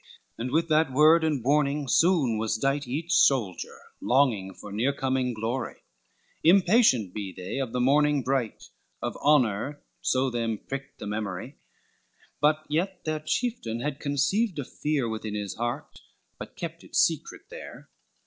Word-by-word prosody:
And 120 +2 -4
with 165 +5 +1
that 155 -2 +3
word 155 +5 +5
and 150 -6 0
warning 145 +1 +1
soon 145 -8 +3
was 110 0 0
dight, 140 +3 0
Each 160 +7 -2
soldier, 120 - +2 0.2
longing 120 -7 +2
for 105 - -10
near 120 +7 0
coming 130 -2 0
glory, 120 +3 -4 0.6
Impatient 175 - +4
be 100 -3 -5
they 90 +8 -5
of 130 -4 -2
the 125 - -2
morning 145 +2 +3
bright, 130 -3 -2 0.3
Of - - -2
honor 140 -1 +2 0.2
so 130 0 +1
them 115 -2 -1
pricked 135 +5 -7
the - - -8
memory: 105 +4 -4 0.8
But 155 +2 +2
yet 175 +5 -2
their 155 -1 -1
chieftain 155 - -2
had 145 +1 -3
conceived 175 +9 0
a 140 - -3
fear 145 -3 -1
Within 110 -1 -4
his 105 -2 -3
heart, 120 +4 -5 0.4
but - - -9
kept - - -6
it - - -12
secret - - +1
there. - - -10
135 Hz, 150 wpm, -27 LUFS, 115-150 Hz, 0.8 s, word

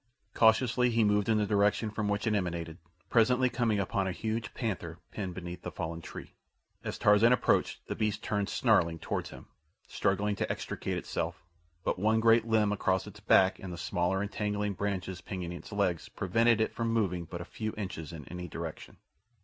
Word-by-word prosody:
Cautiously 120 +2 +4
he 115 -1 +3
moved 105 0 +2
in 110 - +4
the 105 - +2
direction 105 +2 +2
from 110 -1 -2
which 100 0 -1
it 110 - +2
emanated, 85 -4 -2 0.3
presently 125 +2 +4
coming 115 -4 +1
upon 95 0 0
a - - 0
huge 110 +3 -3
panther 90 -8 -3
pinned 95 -4 -4
beneath 90 -1 -7
a - - -3
fallen 85 0 -5
tree. - - -9 0.5
As - - -4
Tarzan 105 +3 +5
approached, 125 - +2
the - - -3
beast 105 -1 -1
turned, 100 -2 -1
snarling, 85 0 +3
toward - - -3
him, - - -11 0.4
struggling 100 +2 0
to - - -1
extricate - - -3
itself; 80 -1 -3 0.4
but - - -1
one 110 +3 +3
great 115 0 +5
limb 110 -2 +3
across 95 -2 +1
its - - -11
back 95 0 +4
and 95 - -7
the 85 - -6
smaller 90 +3 0
entangling 105 0 -2
branches 95 -2 -3
pinioning 90 -3 -5
its - - -12
legs 100 -5 0
prevented 115 +4 +2
it 110 - 0
from 115 -1 -1
moving 95 -6 0
but 85 +1 -7
a 85 - -6
few 110 +3 -4
inches 90 -7 -5
in 80 -4 -8
any 90 +1 -6
direction. - - -7
100 Hz, 185 wpm, -30 LUFS, 90-110 Hz, 0.5 s, Tarzan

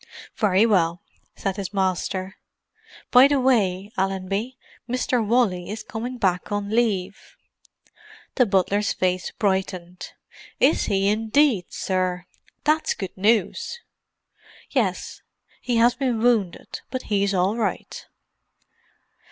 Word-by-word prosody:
"Very 210 -2 +3
well," 180 -4 +1 0.3
said 195 0 -3
his 200 0 -5
master. 190 0 -1 0.7
"By 255 +2 +8
the 285 -1 +1
way, 205 -6 +1
Allenby, 195 +6 -2 0.3
Mr. 250 -1 0
Wally 210 -6 +1
is 215 +1 -5
coming 240 +4 -5
back 185 -2 0
on 205 0 -2
leave." 200 -5 -1 1.0
The 250 -3 +3
butler's 200 +1 +1
face 185 0 -1
brightened. 185 -3 -3 0.5
"Is - - +3
he 195 -1 +1
indeed, 220 - +2
sir! 185 -1 -2 0.4
That's 310 +1 +1
good 190 -2 -6
news." 220 - 0 0.9
"Yes—he 245 - -3
has 235 +1 +5
been 255 -4 -1
wounded, 220 -6 0
but 255 -1 -4
he's 200 -1 0
all 185 +4 +1
right." 230 - -3
205 Hz, 110 wpm, -23 LUFS, 185-235 Hz, 1.0 s, By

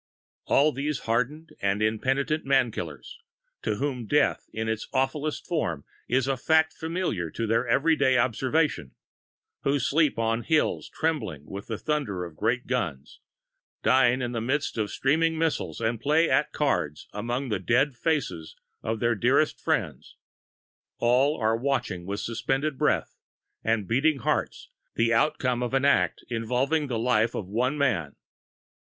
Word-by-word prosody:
All 150 +2 +4
these 145 +2 -3
hardened 125 +8 -1
and 100 +1 +1
impenitent 130 +8 0
man 135 -3 +3
killers, 75 -10 -7 0.4
to 105 - -1
whom 125 -2 -3
death 150 +5 +1
in 110 0 -3
its 110 0 -2
awfulest 140 +3 -1
forms 85 - -2 0.2
is 130 +1 +2
a 135 - +1
fact 160 +4 +2
familiar 160 - -2
to 115 - -3
their 115 +3 +1
every 150 +7 +3
day 130 -3 +3
observation; 130 +6 0 0.7
who 140 +1 +1
sleep 145 +1 +2
on 115 0 0
hills 155 +4 +1
trembling 110 - -2
with 100 +4 -8
the 110 - -3
thunder 115 -13 -2
of 85 -3 -11
great 120 +7 0
guns, 80 - -3 0.6
dine 125 -1 +4
in 120 - -2
the 115 -2 -2
midst 135 +5 -1
of 110 -2 -1
streaming 160 +7 +1
missiles, 160 -1 -1
and 115 0 -1
play 155 +5 +3
at 145 +2 +2
cards 75 - -1
among 120 +5 -3
the 105 - -1
dead 125 - +2
faces 125 - -2 0.3
of 110 0 -2
their 120 0 +3
dearest 105 - +2
friends, - - -2 0.8
all 130 +5 +3
are 110 0 +2
watching 120 -8 -2
with 100 +1 -3
suspended 135 +6 -1
breath - - 0 0.4
and 110 -3 0
beating 140 +6 +2
hearts 125 - -2 0.3
the 115 0 +2
outcome 125 -1 +1
of 125 +2 -1
an 135 +1 +2
act 140 - +2
involving 125 +6 0
the 120 -3 -2
life 115 -1 +2
of 100 - -3
one 125 +8 0
man. 100 - 0
125 Hz, 150 wpm, -26 LUFS, 110-145 Hz, 0.8 s, All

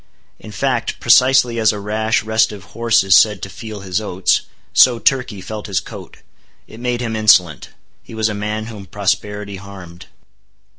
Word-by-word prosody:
In 110 - -11
fact, 125 0 -2
precisely 125 0 +4
as 110 -1 +3
a 105 - -6
rash, 110 +2 -1
restive 110 -2 0
horse 115 -3 +2
is 95 -4 +4
said 105 +2 +4
to 100 - -5
feel 105 +2 -9
his 95 +1 -2
oats, 95 -3 0 0.3
so 125 -2 +5
Turkey 125 -5 0
felt 105 +2 -7
his 95 -4 0
coat. - - -11 0.5
It 110 - -14
made 120 0 -2
him 115 -2 -3
insolent. 90 -8 +3 0.3
He - - -13
was 110 -1 0
a 110 - -3
man 105 +1 -4
whom 105 -4 -10
prosperity 100 +1 -3
harmed. 95 -3 -12
105 Hz, 165 wpm, -18 LUFS, 100-115 Hz, 0.5 s, so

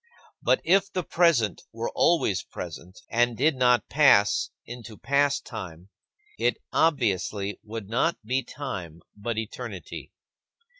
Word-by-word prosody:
But - - +2
if 195 +3 +3
the 185 -2 -2
present 160 - +2
were - - -4
always - - +2
present, 90 +2 -9
and 120 0 +2
did 150 +3 +3
not 125 -1 +3
pass 135 -9 +4 0.2
into 120 -3 -9
past 140 0 +1
time, 95 -5 -8 0.5
it - - +2 0.2
obviously 105 - +1
would 110 -2 -7
not 115 +5 +1
be 130 +4 +1
time 100 - -7
but 110 +2 -4
eternity. 110 0 -6
120 Hz, 120 wpm, -26 LUFS, 100-140 Hz, 0.5 s, pass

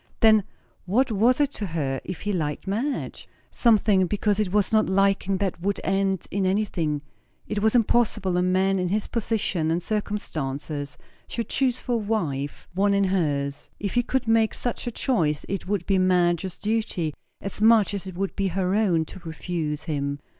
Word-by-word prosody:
Then 220 -3 +6 0.4
what 240 +7 +2
was 230 +6 +3
it 285 -1 +2
to 210 -7 -4
her 140 -6 -2
if 180 -5 -6
he 205 +1 -1
liked 150 -5 -2
Madge? 230 +9 -3 0.2
Something, 210 -5 +3
because 205 +1 0
it 205 -4 0
was 205 +1 +1
not 215 -2 +3
liking 195 0 +2
that 190 -3 -2
would 200 +2 -1
end 195 -1 0
in 200 0 0
anything; 175 -7 0 0.4
it 210 -1 -2
was 220 +2 +3
impossible 215 -5 +2
a 180 - +2
man 190 +1 +2
in 180 -1 0
his 210 +2 0
position 210 -8 -1
and 170 +2 0
circumstances 150 -9 -3 0.3
should 230 - -4
choose 255 -2 +1
for - - -5
a - - +3
wife 165 -11 -2
one 200 +2 +2
in 200 - +3
hers. 145 -7 -1
If 200 -2 -3
he 245 - +3
could 255 0 -1
make 225 -1 +3
such 245 0 -3
a - - -1
choice, 160 - 0
it 195 -1 -4
would 195 -3 -1
be 195 -1 +2
Madge's 180 -1 +2
duty, 210 -8 -1 0.3
as 195 +1 -4
much 220 -2 +5
as 195 -1 -4
it 185 - -7
would 195 0 -2
be 195 -1 0
her 185 0 0
own, 185 -7 +2
to 185 - -11
refuse 160 -2 -4
him. 140 -3 -2
195 Hz, 180 wpm, -25 LUFS, 170-215 Hz, 0.4 s, Then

